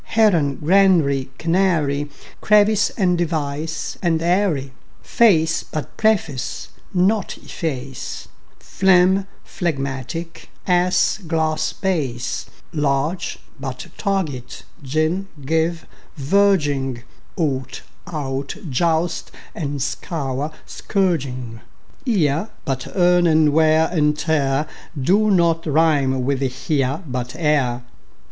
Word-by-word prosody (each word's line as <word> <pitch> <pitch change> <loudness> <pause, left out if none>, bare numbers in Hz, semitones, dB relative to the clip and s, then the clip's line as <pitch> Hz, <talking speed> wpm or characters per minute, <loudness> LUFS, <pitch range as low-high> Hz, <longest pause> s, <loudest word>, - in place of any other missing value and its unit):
Heron; 170 -11 +4
granary, 160 -6 +3
canary; 165 -5 +1 0.3
Crevice, 210 -1 +4
and 180 -3 +2
device, 155 -1 -3
and 170 -3 +1
eyrie; 170 -6 +1 0.3
Face 165 -9 +3
but 150 -5 -6
preface, 190 - 0 0.2
but 195 +2 +1
efface, 135 - -5 0.3
Phlegm, 190 +1 +3 0.2
phlegmatic; 150 +1 -4 0.2
ass, 180 +2 +2
glass, 160 -1 0
bass; 135 -11 -2 0.3
Large, 150 +3 -1 0.2
but 135 -2 -5
target, 160 -11 -3 0.2
gin, 155 +7 -1 0.2
give, 160 +2 0 0.3
verging; 145 -7 +1 0.3
Ought, 135 -6 -2 0.2
out, 140 -4 -4 0.2
joust 165 +4 0 0.2
and 145 -3 -4
scour, 145 -3 -3
but - - -20
scourging; 130 - -2 0.5
Ear, 170 - +1 0.2
but 130 -2 -2
earn; 180 -1 +4
and 155 -2 +4
wear 160 0 +4
and 150 -3 +2
tear 150 -2 +1 0.3
Do 200 +10 +3
not 170 -4 +2
rime 145 -4 +2
with 140 0 0
"here", 135 +3 -1
but 125 -3 -4
"ere". 140 -6 +1
155 Hz, 95 wpm, -21 LUFS, 135-180 Hz, 0.5 s, Heron